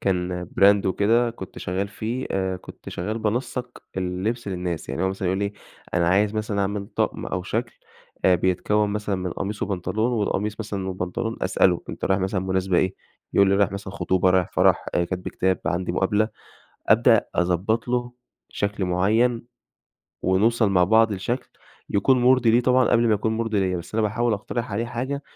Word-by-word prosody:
كان 90 -2 -1 0.2
brand 100 0 +6
وكده 115 +5 +2
كنت 95 -5 -9
شغاّل 95 +3 -2
فيه 115 +5 -4
آآ 95 -1 -1
كنت - - -12
شغّال 105 +6 -3
بانسّق 120 +3 -3
اللبس 95 +5 -2
للناس. 90 -3 -4
يعني 70 - -2
هو 95 - +2
مثلًا 95 -1 -2
يقول 95 - 0
لي 100 0 -1 0.4
أنا 85 -1 +2
عايز 100 +4 +2
مثلًا 105 -1 -1
أعمل 100 0 -2
طقم - - -2
أو 90 - -3
شكل 115 +4 -3 0.5
أ 90 - +6
بيتكوّن 95 +4 +1
مثلًا 105 -1 -2
من 90 -1 -3
قميص 100 +3 -4
وبنطلون 105 +4 -1
والقميص 105 -1 -1
مثلًا 100 -3 -4
والبنطلون 95 +5 -3
أسأله، 90 -1 +2
أنت - - -5
رايح 95 0 +2
مثلًا 95 0 -1
مناسبة 95 -1 +1
إيه؟ 95 0 +1 0.4
يقول 100 -1 +5
لي 100 - +3
رايح 100 -2 +2
مثلًا 100 -1 -6
خطوبة، 95 -1 +1
رايح 90 -1 +2
فَرَح، - - +3
آآ 85 - +2
كتب 90 +1 -4
كتاب، 95 -1 0
عندي 90 +2 -1
مُقابلة، 105 +4 +1 0.6
أبدأ - - +5
أضبّط 90 +7 0
له 120 0 -1 0.4
شكل 100 -1 -2
معيّن، 110 +7 +2 0.8
ونوصل 105 +3 +3
مع 90 -2 +4
بعض 110 +2 +4
لشكل 120 +7 -3 0.4
يكون 125 +6 +3
مُرضي 125 -2 +5
ليه 120 +2 +5
طبعًا 125 0 +3
قبل 120 0 +4
ما 110 - +4
يكون 110 +2 -1
مُرضي 110 -3 0
ليّا، 95 -1 0
بس 85 +4 -8
أنا 110 - +2
باحاول 115 +3 +1
أقترح 110 +2 -3
عليه 115 +4 -1
حاجة 130 +4 -3
100 Hz, 175 wpm, -24 LUFS, 95-115 Hz, 0.8 s, brand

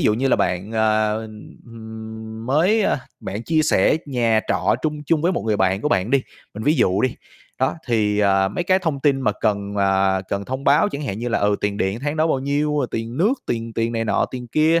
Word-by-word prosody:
dụ 105 - +3
như 135 +4 0
là - - +4
bạn, 95 +5 -1
ờ, 110 -1 +2 0.5
ừm, 110 0 -9
mới, 180 +11 +3
ơ - - +2 0.2
bạn 105 +4 -5
chia 160 +3 +1
sẻ 155 0 +3
nhà 115 -5 +2
trọ - - +2
trung 150 -1 -2
chung 160 -3 +2
với 175 +3 +2
một - - -2
người 105 -1 +1
bạn 95 +1 +1
của 150 - 0
bạn 95 0 0
đi, 140 -1 +3 0.3
mình 105 - -6
ví 150 - +3
dụ 95 -7 +2
đi, 130 - +1 0.4
đó, 130 - +1
thì, 105 -4 +1
à, 95 -1 +3
mấy 175 - -3
cái 185 +1 +3
thông 160 -7 -2
tin 135 -1 +2
mà 105 - +1
cần, 100 -1 -1
à, 95 -1 +2
cần 100 0 -2
thông 130 +4 -5
báo 145 +9 +4
chẳng 150 -5 -5
hạn 100 -7 -4
như 120 +1 -3
là, 120 - +1
ừ, 100 0 +2
tiền 100 0 -1
điện 95 +3 -1
tháng 145 +3 -2
đó 155 - +2
bao 145 -5 +1
nhiêu, 145 +2 0
ờ, 130 - 0
tiền 115 +2 -4
nước, 200 +9 +3
tiền 115 -1 -3
tiền 115 +1 -1
này 115 0 -1
nọ, 110 - +1
tiền 125 -1 -6
kia, 160 +5 +3
115 Hz, 240 wpm, -21 LUFS, 105-145 Hz, 0.5 s, là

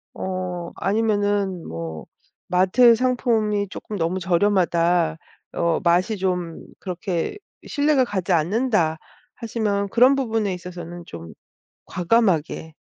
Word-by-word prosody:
어 185 -2 -4
아니면은 205 -3 0
뭐 80 -1 -6 0.4
'마트 190 +7 +5
상품이 225 -5 0
쪼끔 210 +2 -7
너무 170 +3 0
저렴하다.', 175 -3 +2 0.4
어 170 -1 +1
'맛이 180 +5 +2
좀 180 -3 -2 0.2
그렇게 180 - -3 0.3
신뢰가 290 -2 +2
가지 190 -5 -1
않는다.' 175 -1 +1 0.4
하시면 210 -3 -2
그런 250 +6 +5
부분에 225 -6 -1
있어서는 175 -1 -8
좀 85 -1 -10 0.5
과감하게, 175 -5 0
185 Hz, 240 characters per minute, -22 LUFS, 170-220 Hz, 0.5 s, 마트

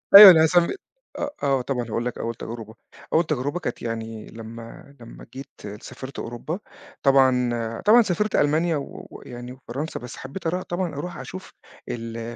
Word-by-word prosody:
أيوه، 200 -1 +14
أنا 160 -2 +6
هاس 160 +2 +2 0.6
آه، 290 - -1
آه، 135 -2 +2
طبعًا، 125 -1 -2
هاقول 115 +2 -2
لك 125 - -3
أول 115 0 -3
تجربة. 115 -1 -8 0.4
أول 160 - +5
تجربة 145 +2 -1
كانت 125 - -4
يعني، 115 -1 -5
لمَّا 115 +4 -10
لمَّا 115 -1 -12
جيت 135 +1 -8 0.3
سافِرت 130 0 -8
أوروبا، 120 - -5 0.4
طبعًا 130 -3 +4
آآ، 115 -1 -3
طبعًا 225 +4 +8
سافِرت 210 0 0
ألمانيا 155 +3 +2
و 140 - -8
ويعني 125 0 -9
فرنسا، 145 +7 -4
بس 125 0 -9
حبِّيت 140 +7 -6
أرا 180 +3 -1
طبعًا، 175 -3 -3
أروح 175 +5 -5
أشوف 185 0 -9 0.4
ال 115 0 -5
130 Hz, 165 wpm, -24 LUFS, 115-160 Hz, 0.6 s, أيوه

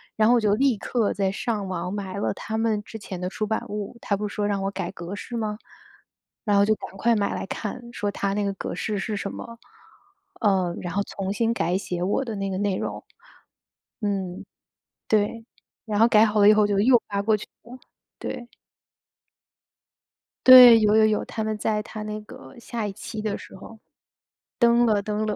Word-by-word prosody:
然 215 0 +3
后 245 - +6
我 - - +4
就 215 -2 +1
立 260 +1 +2
刻 225 +1 -1
在 195 -1 0
上 210 -1 -3
网 180 -1 -4
买 195 -1 -5
了 200 - 0
它 220 +1 -4
们 220 -2 0
之 220 - -9
前 190 -3 -7
的 180 - -3
出 215 +3 -3
版 220 - -2
物， 210 +2 -5
它 200 - 0
不 210 +1 -3
是 205 - -9
说 205 - -1
让 200 -1 -1
我 195 - -1
改 190 -3 -4
格 175 +1 -7
式 240 +3 -7
嘛？ 215 -2 -2 0.9
然 205 -2 +2
后 200 - +5
就 215 +1 +2
赶 - - -9
快 235 +4 +2
买 200 -2 0
来 - - -4
看， 215 +5 -5
说 205 -4 -2
它 200 0 -2
那 205 +1 -1
个 200 -1 -1
格 185 - -5
式 210 +2 -2
是 215 +2 -3
什 200 0 -4
么。 230 -1 -9 0.8
呃， 190 -5 +2
然 175 -1 -5
后 200 - +1
重 195 -1 -5
新 230 +3 0
改 180 -5 0
写 180 -2 -4
我 205 +8 0
的 225 -3 -4
那 195 -1 -3
个 190 - -3
内 200 -1 0
容， - - -4 1.0
嗯， 195 -3 -3 0.6
对， 215 +2 0 0.4
然 215 -2 -1
后 225 - +6
改 220 -2 +6
好 215 -1 +1
了 205 - +7
以 215 - +8
后 210 -1 +4
就 205 -1 0
又 240 +2 +5
发 200 -1 -1
过 215 +1 +2
去 210 - -9 0.2
了， 245 +3 -11 0.4
对。 245 -2 -6 2.0
对， 250 -3 +11
有 210 0 +4
有 220 - +6
有， 215 -1 +1
它 220 - -4
们 215 0 -2
在 210 0 -1
它 215 0 -8
那 215 0 -5
个 225 +4 -13
下 230 -2 -4
一 205 - -4
期 215 +2 -7
的 215 -1 -2
时 - - -13
候。 220 +4 -12 0.8
登 235 0 +4
了 215 -3 +2
登 210 +1 -2
了。 210 -1 -1
210 Hz, 225 characters per minute, -24 LUFS, 200-220 Hz, 2.0 s, 对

